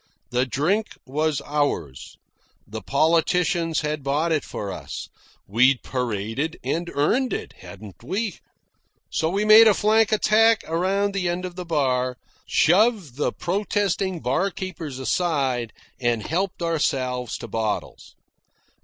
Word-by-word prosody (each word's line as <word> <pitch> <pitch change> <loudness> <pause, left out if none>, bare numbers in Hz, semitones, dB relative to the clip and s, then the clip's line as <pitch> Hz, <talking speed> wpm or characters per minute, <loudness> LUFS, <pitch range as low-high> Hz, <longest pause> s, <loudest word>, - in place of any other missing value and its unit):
The 125 +2 +1
drink 180 - 0
was 150 +2 -1
ours. 140 - -2 0.5
The 110 +2 -7
politicians 165 - +1
had 150 -1 -2
bought 145 +5 0
it 155 -3 +1
for 100 -1 -5
us. - - -7 0.4
We'd 125 +5 +3
paraded 125 +4 -3
and 165 +7 -2
earned 240 - +1
it, - - -5
hadn't 100 -1 -12
we? 195 - -3 0.7
So 160 - 0
we 200 +4 0
made 220 +1 +9
a 210 - +5
flank 220 +1 +3
attack 220 +1 +4
around 195 +5 0
the 185 -3 -1
end 175 +1 -2
of 180 -1 -7
the 180 -1 -6
bar, 130 -6 0 0.3
shoved 190 - +3
the 150 - 0
protesting 195 -1 -1
barkeepers 165 0 -2
aside, 135 -5 0 0.3
and 120 -4 0
helped 180 +1 -2
ourselves 130 -7 -1
to - - -8
bottles. 110 -2 -4
160 Hz, 125 wpm, -23 LUFS, 130-190 Hz, 0.7 s, made